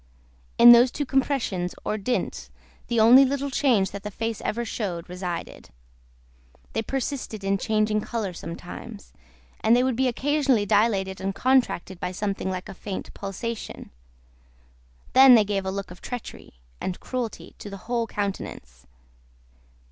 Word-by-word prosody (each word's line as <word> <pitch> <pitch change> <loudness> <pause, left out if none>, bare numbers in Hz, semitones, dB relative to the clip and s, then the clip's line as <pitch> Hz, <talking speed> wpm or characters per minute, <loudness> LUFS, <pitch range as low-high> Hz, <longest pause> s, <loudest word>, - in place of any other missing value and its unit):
In 240 0 +10
those 240 +2 +7
two 290 +4 -3
compressions, 255 -10 -1
or - - 0
dints, 215 +4 -3 0.4
the 235 -1 0
only 240 +5 +8
little 280 +1 -1
change 240 -9 +2
that 200 - -7
the 210 - -5
face 225 +2 -4
ever 235 +2 -2
showed, 180 -7 -4
resided. 180 -1 -6 1.0
They 225 - 0
persisted 255 -4 -4
in 195 0 +1
changing 215 0 +1
colour 210 -5 -3
sometimes, 165 - -9 0.5
and 225 +2 +4
they 250 - +3
would 260 -2 0
be 260 +2 +2
occasionally 265 -3 +1
dilated 195 -2 +1
and 195 0 -2
contracted 250 -8 +1
by 180 0 -3
something 195 -1 -2
like 185 -1 -4
a - - -8
faint 195 0 -7
pulsation; 205 +4 -6 1.2
then, 260 -1 +9
they 220 - +6
gave 195 -2 -2
a - - -1
look 195 -1 -5
of 180 - -12
treachery, 245 - -8 0.3
and 185 - -3
cruelty, 250 -3 -5
to 205 - -8
the 195 - -7
whole 235 -1 -1
countenance. 125 - -5
215 Hz, 150 wpm, -25 LUFS, 190-245 Hz, 1.2 s, In